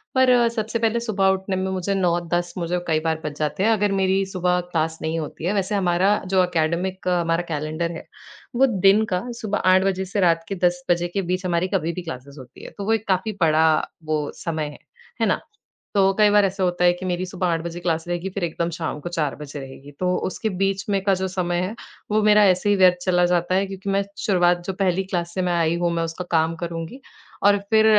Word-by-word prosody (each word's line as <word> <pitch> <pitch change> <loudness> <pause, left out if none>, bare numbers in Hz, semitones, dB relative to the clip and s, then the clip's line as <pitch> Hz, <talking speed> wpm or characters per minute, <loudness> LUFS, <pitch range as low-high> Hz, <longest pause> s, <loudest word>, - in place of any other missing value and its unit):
पर 260 0 +5
अ, 240 -1 +5
सबसे 230 0 -2
पहले 230 0 +1
सुबह 210 -5 0
उठने 190 0 -4
में 190 0 -1
मुझे 190 +1 -1
9-10 175 -1 0
मुझे 175 +1 -1
कई 155 -1 +2
बार 160 0 0
बज 150 0 -5
जाते 155 +6 -1
हैं 225 - +4
अगर 210 -2 +2
मेरी 190 +1 +2
सुबह 180 0 +1
क्लास 160 0 -1
नहीं 160 +1 -1
होती 155 +2 -6
है। 195 - +1
वैसे 200 +1 0
हमारा 190 +2 +2 0.2
जो 185 -1 +5
एकेडमिक 180 +2 -1
हमारा 170 -1 +1
कैलेंडर 155 +3 -2
है, 165 - -8 0.5
वो 265 +2 +5 0.2
दिन 210 +3 +6
का 180 - 0 0.2
सुबह 210 -1 -1
8 190 0 +5
बजे 190 -1 0
से 200 +2 -3
रात 165 0 +2
के 195 - -3
10 175 0 -3
बजे 175 0 +2
के - - +2
बीच 185 +1 -1
हमारी 175 +1 +1
कभी 170 -2 0
भी 180 - -5
क्लासेस 140 -4 -8
होती 125 -2 -13
हैं - - -9
तो 200 - -4
वो 225 - +2
एक 220 -1 -2
काफ़ी 190 +3 +1
बड़ा 160 -1 +4 0.4
वो 155 -1 0
समय 160 -3 -3
है। 150 - -12 0.4
है - - +4
ना? - - +1 0.6
तो 195 -1 +4
कई 210 - +6
बार 205 -1 +5
ऐसा 190 0 -2
होता 180 0 0
है 175 - +7
कि 180 +1 -7
मेरी 180 0 -1
सुबह 185 0 -2
8 165 -1 0
बजे 170 0 -6
क्लास 165 -1 -1
रहेगी 175 +2 -2
फिर 200 - -2
एकदम 170 0 -1
शाम 160 -3 -4
को 175 - -6
4 155 -5 -1
बजे 145 -1 -8
रहेगी। 135 +1 -10
तो 180 0 +1
उसके 220 +3 -3
बीच 195 0 0
में 195 -1 +1
का 195 -1 +3
जो 190 - 0
समय 175 -1 -1
है, 195 +5 -3 0.4
वो 215 0 +3
मेरा 210 0 +6
ऐसे 185 +3 +1
ही 205 - +4
व्यर्थ 185 -2 +5
चला 180 -1 +3
जाता 175 +1 +1
है 195 +1 +2
क्योंकि 195 0 -6
मैं 195 0 +2 0.2
शुरुआत 175 -3 +3
जो 190 - -1
पहली 190 -1 +1
क्लास 175 -2 -3
से 185 - 0
मैं 180 -1 0
आई 170 -1 +1
हूँ 175 -1 +1
मैं 165 - 0
उसका 165 +2 -5
काम 165 0 +2
करुँगी, 170 +10 -5 0.4
और 205 0 +5
फिर 220 0 +5
180 Hz, 235 wpm, -23 LUFS, 170-195 Hz, 0.6 s, है